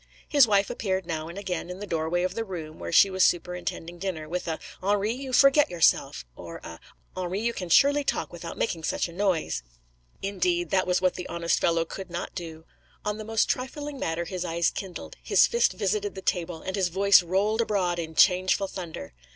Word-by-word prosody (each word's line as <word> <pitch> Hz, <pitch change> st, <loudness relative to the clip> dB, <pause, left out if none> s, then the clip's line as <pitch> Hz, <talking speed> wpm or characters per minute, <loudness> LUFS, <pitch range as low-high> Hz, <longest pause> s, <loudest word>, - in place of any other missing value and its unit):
His 285 Hz, -5 st, +6 dB
wife 200 Hz, 0 st, +2 dB
appeared 190 Hz, -6 st, -2 dB
now 160 Hz, -2 st, -4 dB
and 170 Hz, +3 st, -9 dB
again 180 Hz, -3 st, -4 dB
in 180 Hz, -, -6 dB
the 205 Hz, -, -6 dB
doorway 165 Hz, 0 st, -1 dB
of 185 Hz, -, -1 dB
the 225 Hz, -, -2 dB
room, 165 Hz, -6 st, -7 dB
where -, -, -5 dB
she 195 Hz, +3 st, +6 dB
was 185 Hz, 0 st, +2 dB
superintending 175 Hz, -1 st, -1 dB
dinner, 170 Hz, -5 st, -4 dB
with 175 Hz, +2 st, -4 dB
a 160 Hz, -1 st, -1 dB, 0.2 s
'Henri, 205 Hz, +2 st, +1 dB
you 265 Hz, +1 st, -6 dB
forget 275 Hz, +3 st, +5 dB
yourself,' 170 Hz, -, +2 dB
or 85 Hz, -1 st, -9 dB
a 80 Hz, 0 st, -9 dB, 0.4 s
'Henri, 185 Hz, +1 st, -2 dB
you 235 Hz, +2 st, 0 dB
can 180 Hz, -5 st, -6 dB
surely 285 Hz, -, +5 dB
talk -, -, -2 dB
without -, -, -7 dB
making 165 Hz, -7 st, -2 dB
such -, -, -1 dB
a 170 Hz, -, -11 dB
noise.' 180 Hz, -, 0 dB, 0.6 s
Indeed, 180 Hz, -3 st, 0 dB
that 185 Hz, -1 st, +2 dB
was 180 Hz, 0 st, +2 dB
what 185 Hz, -1 st, +2 dB
the 180 Hz, -, -6 dB
honest 170 Hz, 0 st, 0 dB
fellow 165 Hz, -1 st, +2 dB
could 190 Hz, +2 st, -8 dB
not 175 Hz, 0 st, -5 dB
do. 160 Hz, -2 st, -8 dB, 0.4 s
On 210 Hz, +1 st, -2 dB
the -, -, -5 dB
most 225 Hz, 0 st, +1 dB
trifling 285 Hz, +2 st, -3 dB
matter 165 Hz, -3 st, -2 dB
his 180 Hz, +1 st, -4 dB
eyes 170 Hz, -1 st, 0 dB
kindled, 190 Hz, -3 st, -7 dB
his -, -, +5 dB
fist 475 Hz, 0 st, +2 dB
visited 415 Hz, -1 st, -1 dB
the 190 Hz, -, -8 dB
table, 170 Hz, -2 st, -2 dB
and 190 Hz, -, -3 dB
his 190 Hz, -3 st, +1 dB
voice 195 Hz, +3 st, +5 dB
rolled 200 Hz, +6 st, +1 dB
abroad 185 Hz, -6 st, 0 dB
in 160 Hz, -1 st, -5 dB
changeful 185 Hz, +2 st, +4 dB
thunder. 165 Hz, -, -7 dB
185 Hz, 205 wpm, -26 LUFS, 170-205 Hz, 0.6 s, His